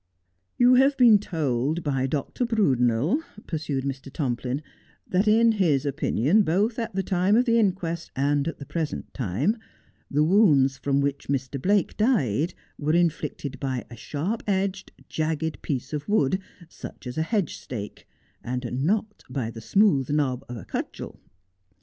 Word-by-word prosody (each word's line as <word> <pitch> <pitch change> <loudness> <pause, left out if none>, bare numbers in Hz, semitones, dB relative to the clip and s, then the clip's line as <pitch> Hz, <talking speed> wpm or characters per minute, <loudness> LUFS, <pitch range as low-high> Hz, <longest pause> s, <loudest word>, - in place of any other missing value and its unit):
' 90 0 -49
You 245 +1 +6
have 270 +2 +4
been 230 -5 +7
told 155 - -1
by 135 -3 0
Dr. 145 - -2
Brudenel,' 145 - +2 0.2
pursued 150 -4 -3
Mr. 135 0 -5
Tomplin, 130 0 -2 0.2
' - - -34
that 190 +4 +2
in 225 +2 +5
his 160 -10 +2
opinion, 145 - +2
both 205 +6 +1
at 230 -4 -4
the 195 - 0
time 185 +3 +2
of 250 - +3
the 230 -1 +3
inquest 180 -5 -1
and 140 +2 +1
at 165 - -4
the 140 - -9
present 155 0 -4
time, 135 - 0 0.5
the 150 +2 +2
wounds 150 -8 +4
from 140 0 +1
which 140 0 -2
Mr. 135 -1 -2
Blake 200 +3 +2
died 175 - +1 0.2
were 150 +1 0
in 170 -1 +4
flicted 140 -2 -6
by 130 -3 -3
a - - -8
sharp 160 - -3
edged, 190 -1 -1 0.2
jagged 160 0 -2
piece 135 0 -3
of 150 +2 -4
wood, 185 -4 +2 0.3
such - - -10
as 125 0 -5
a 160 - 0
hedge 195 0 -1
stake, 105 -5 -8 0.4
and 125 +1 -3
not 210 +5 -1
by 125 -3 -3
the 115 - -9
smooth 145 - +3
knob 140 -4 0
of 125 - -5
a 100 - -9
cudgel. - - -5
150 Hz, 165 wpm, -25 LUFS, 135-195 Hz, 0.5 s, been